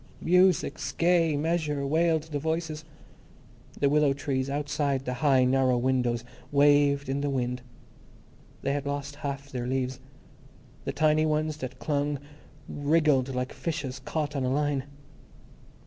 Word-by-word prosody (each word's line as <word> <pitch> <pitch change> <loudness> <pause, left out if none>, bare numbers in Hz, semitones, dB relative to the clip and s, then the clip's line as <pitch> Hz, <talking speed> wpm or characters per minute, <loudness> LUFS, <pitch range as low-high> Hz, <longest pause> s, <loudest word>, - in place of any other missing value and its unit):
Music's 180 +1 +2
Gay 165 -3 +3
Measure, 150 -2 -1
wailed 160 +2 +2
the 155 -2 -4
voices. 160 0 -2 1.0
The 140 - +3
willow 145 0 +3
trees, 135 -2 -2
outside 145 -1 -1
the 125 - -2
high, 135 -4 +4
narrow 130 -1 +3
windows, 125 -2 +1 0.3
waved 145 0 +4
in 135 +1 -1
the 145 - 0
wind. 125 -2 -2 1.0
They 140 - 0
had 145 0 -3
lost 140 0 -4
half 140 -1 -5
their 125 -2 -3
leaves. 130 0 -2 0.9
The - - -1
tiny 155 0 +3
ones 155 0 0
that 130 -4 -6
clung 145 -1 -1 0.5
wriggled 145 -3 +2
like 125 +1 -2
fishes 140 -6 -4
caught 150 +3 -3
on 135 - -1
a 125 - 0
line. 140 -1 0
145 Hz, 135 wpm, -27 LUFS, 135-155 Hz, 1.0 s, high